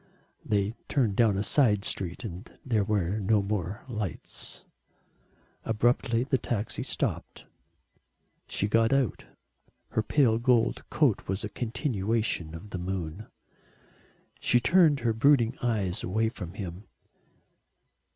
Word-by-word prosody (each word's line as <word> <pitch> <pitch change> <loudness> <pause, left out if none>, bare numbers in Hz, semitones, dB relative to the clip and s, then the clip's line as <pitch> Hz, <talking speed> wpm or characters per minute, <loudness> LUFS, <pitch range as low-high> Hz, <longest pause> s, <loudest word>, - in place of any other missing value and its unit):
They 105 0 0 0.2
turned 115 -8 +1
down 110 -4 +3
a 100 - 0
side 105 -6 +3
street 90 +4 -3
and 95 -4 -7
there 110 -5 +2
were 100 -1 0
no 105 0 +2
more 100 0 -3
lights. 105 -7 -5 1.0
Abruptly 120 +1 +1
the 130 -1 0
taxi 110 -3 -2
stopped. - - -2 1.0
She 100 - -1
got 115 +1 +3
out. 135 -6 +1 0.6
Her - - 0
pale 115 -1 +3
gold 120 -1 +1
coat 140 -9 +1
was 95 +1 -2
a 105 - -3
continuation 110 - -1
of 100 +5 -10
the 90 - -4
moon. 90 +2 -4 1.1
She 120 - +3
turned 150 +1 +4
her 115 -1 +1
brooding 120 0 +4
eyes 105 -7 0
away 110 +4 0
from 95 -6 -8
him. 95 0 -6
110 Hz, 120 wpm, -28 LUFS, 100-120 Hz, 1.1 s, turned